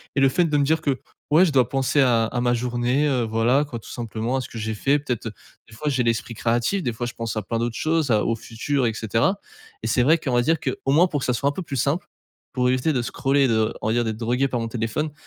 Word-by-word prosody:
et 140 Hz, -, +2 dB
le 135 Hz, -, +5 dB
fait 175 Hz, +6 st, +2 dB
de 150 Hz, -2 st, +1 dB
me 145 Hz, -, +3 dB
dire 160 Hz, +3 st, +1 dB
que, 140 Hz, -4 st, 0 dB, 0.3 s
ouais, 170 Hz, +5 st, +6 dB
je 165 Hz, -, 0 dB
dois 130 Hz, -4 st, +3 dB
penser 135 Hz, +1 st, +1 dB
à 120 Hz, -4 st, +3 dB
à 120 Hz, +2 st, -2 dB
ma 120 Hz, 0 st, +2 dB
journée, 125 Hz, +4 st, 0 dB
heu, 130 Hz, -4 st, +1 dB
voilà 115 Hz, +5 st, +2 dB
quoi 135 Hz, -5 st, -6 dB
tout -, -, -13 dB
simplement, 115 Hz, +1 st, -3 dB
à -, -, -1 dB
ce -, -, -8 dB
que 115 Hz, -, -9 dB
j'ai 110 Hz, 0 st, -3 dB
fait. 140 Hz, +7 st, +2 dB
Peut-être, 125 Hz, -5 st, -4 dB
heu, 110 Hz, -, -4 dB, 0.4 s
des 110 Hz, -, -14 dB
fois 150 Hz, +7 st, -2 dB
j'ai 130 Hz, -3 st, +1 dB
l'esprit 115 Hz, 0 st, -1 dB
créatif, 120 Hz, -, 0 dB
des 120 Hz, -, 0 dB
fois 120 Hz, +2 st, -4 dB
je 120 Hz, -, -5 dB
pense 115 Hz, -1 st, -4 dB
à -, -, 0 dB
plein 115 Hz, +3 st, -2 dB
d'autres 120 Hz, -1 st, -2 dB
choses 155 Hz, -3 st, 0 dB
à 105 Hz, -1 st, +2 dB
au 115 Hz, -, +1 dB
futur 120 Hz, +4 st, -2 dB
et 110 Hz, -, -1 dB
cetera 115 Hz, -, 0 dB, 0.4 s
et -, -, -1 dB
c'est 125 Hz, -, +2 dB
vrai 155 Hz, +6 st, +5 dB
qu'on 140 Hz, -6 st, -3 dB
va 120 Hz, -, +4 dB
dire 160 Hz, +5 st, +1 dB
qu'au 135 Hz, -2 st, -2 dB
moins 160 Hz, +5 st, +5 dB
pour 145 Hz, -4 st, -2 dB
que -, -, -2 dB
ça 125 Hz, -, +2 dB
soit 140 Hz, +5 st, +1 dB
un -, -, -1 dB
peu 190 Hz, -, -5 dB
plus 150 Hz, -4 st, -6 dB
simple, 140 Hz, +8 st, 0 dB, 0.5 s
pour 125 Hz, -1 st, +1 dB
éviter 130 Hz, +5 st, +1 dB
de 125 Hz, -, 0 dB
scroller, 135 Hz, +3 st, +1 dB
de 110 Hz, -2 st, +1 dB
on -, -, 0 dB
va 110 Hz, -, +1 dB
dire 120 Hz, -, +2 dB
d'être 110 Hz, -2 st, -3 dB
drogué 125 Hz, +4 st, 0 dB
par 125 Hz, -2 st, -2 dB
mon 115 Hz, -, -2 dB
téléphone. 115 Hz, +6 st, -2 dB
125 Hz, 290 wpm, -23 LUFS, 115-145 Hz, 0.5 s, ouais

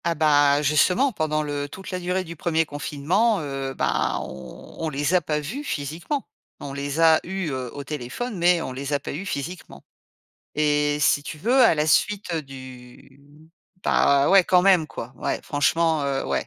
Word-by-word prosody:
Ah 170 Hz, -1 st, +1 dB
bah, 145 Hz, -2 st, +4 dB
justement, 180 Hz, -, +3 dB
pendant 155 Hz, -6 st, -1 dB
le 145 Hz, -1 st, -4 dB
toute 190 Hz, +6 st, -9 dB
la 185 Hz, -, -3 dB
durée 180 Hz, +1 st, -1 dB
du 170 Hz, -1 st, -9 dB
1er 165 Hz, 0 st, 0 dB
confinement, 170 Hz, +9 st, 0 dB
heu, 135 Hz, -3 st, -4 dB
bah -, -, 0 dB
on 65 Hz, -1 st, -10 dB
on 160 Hz, -, -2 dB
les 145 Hz, +3 st, -1 dB
a 180 Hz, -, +4 dB
pas 150 Hz, -1 st, -1 dB
vus 205 Hz, -, -5 dB
physiquement. 165 Hz, -, -4 dB, 0.3 s
On 140 Hz, -, -7 dB
les 140 Hz, +2 st, -4 dB
a 160 Hz, -1 st, +6 dB
eus, 190 Hz, -3 st, -4 dB
heu, 130 Hz, -2 st, -4 dB
au 145 Hz, -, -6 dB
téléphone 150 Hz, -, -5 dB
mais 175 Hz, 0 st, +3 dB
on -, -, -5 dB
les 140 Hz, +2 st, -4 dB
a 145 Hz, -, +1 dB
pas -, -, -7 dB
eus 185 Hz, +8 st, -6 dB
physiquement 165 Hz, +5 st, -6 dB, 0.7 s
et 150 Hz, -1 st, +2 dB
si 145 Hz, -, +3 dB
tu 155 Hz, -, -7 dB
veux, 240 Hz, -, +2 dB
à 230 Hz, -, +6 dB
la 150 Hz, 0 st, +1 dB
suite 195 Hz, +2 st, +1 dB
du 130 Hz, -2 st, -10 dB, 0.6 s
bah 140 Hz, 0 st, +3 dB
ouais, 195 Hz, -1 st, +7 dB
quand 180 Hz, 0 st, +4 dB
même 180 Hz, -4 st, +4 dB
quoi. 120 Hz, +2 st, -8 dB
Ouais, -, -, -2 dB
franchement, 160 Hz, +2 st, +1 dB
heu, 135 Hz, -1 st, -1 dB
ouais, -, -, -1 dB
150 Hz, 185 wpm, -24 LUFS, 140-180 Hz, 0.7 s, ouais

